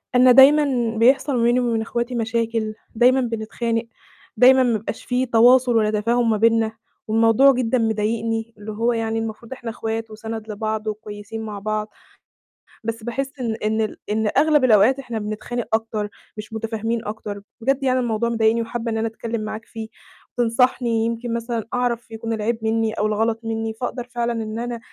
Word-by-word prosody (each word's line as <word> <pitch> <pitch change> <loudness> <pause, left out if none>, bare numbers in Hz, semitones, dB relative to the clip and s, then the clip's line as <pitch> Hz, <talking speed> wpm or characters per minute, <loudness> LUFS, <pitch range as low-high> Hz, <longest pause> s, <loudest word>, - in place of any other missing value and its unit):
أنا 250 0 +7
دايمًا 265 -3 +5
بيحصل 260 +4 +3
ما 230 - +1
بيني 240 +1 +3
وبين 235 -2 0
إخواتي 235 +2 -3
مشاكل، 225 -1 -1 0.2
دايمًا 250 +3 +4
بنتخانق، 230 0 -2 0.5
دايمًا 260 +3 +7
ما 235 -3 +2
بيبقاش 215 +1 -7
فيه 250 +1 0
تواصل 245 +1 +5
ولا 215 -1 +3
تفاهم 230 +3 +1
ما 220 - +2
بينا 225 0 +3 0.4
والموضوع 225 +5 +5
جدًا 250 -1 0
مضايقني، 225 0 -1
اللي 210 +1 -7
هو 230 +3 0
يعني 225 -1 -1
المفروض 225 +2 -6
إحنا 245 -3 -7
إخوات 225 0 -4
وسند 220 0 -6
لبعض 215 +1 -3
وكويسين 215 0 -6
مع 210 -2 -6
بعض، 215 +1 -2 0.9
بس 225 0 -4
باحِسّ 265 +4 -3
إن 230 -3 -1
إن 220 +1 +1
ال 215 - -3
إن 215 0 +1
أغلب 300 -1 +4
الأوقات 240 +2 +5
إحنا 240 -4 -4
بنتخانق 215 +3 -4
أكتر، 220 -2 -3 0.3
مش 215 +1 -8
مُتفاهمين 225 +1 -3
أكتر، 210 -1 -6 0.2
بجد 270 +3 +1
يعني 255 -1 +2
الموضوع 235 -1 0
مضايقني 225 0 +2
وحابة 230 0 -3
إن 225 - -1
أنا 225 +1 0
أتكلِّم 225 0 -4
معاك 215 +1 -6
فيه 225 -1 -7 0.5
وتنصحني 235 -1 +2
يمكن 230 +1 -3
مثلًا 230 -1 -2
أعرف 240 -2 -1
يكون 225 0 -4
العيب 225 +1 -1
مِنّي 220 0 +1
أو 210 - -1
الغلط 220 +1 0
مِنّي، 225 0 -3
فأقدر 245 +2 -4
فعلًا 240 -1 -2
إن 215 +1 -5
أنا 240 0 -4
225 Hz, 170 wpm, -22 LUFS, 220-240 Hz, 0.9 s, أنا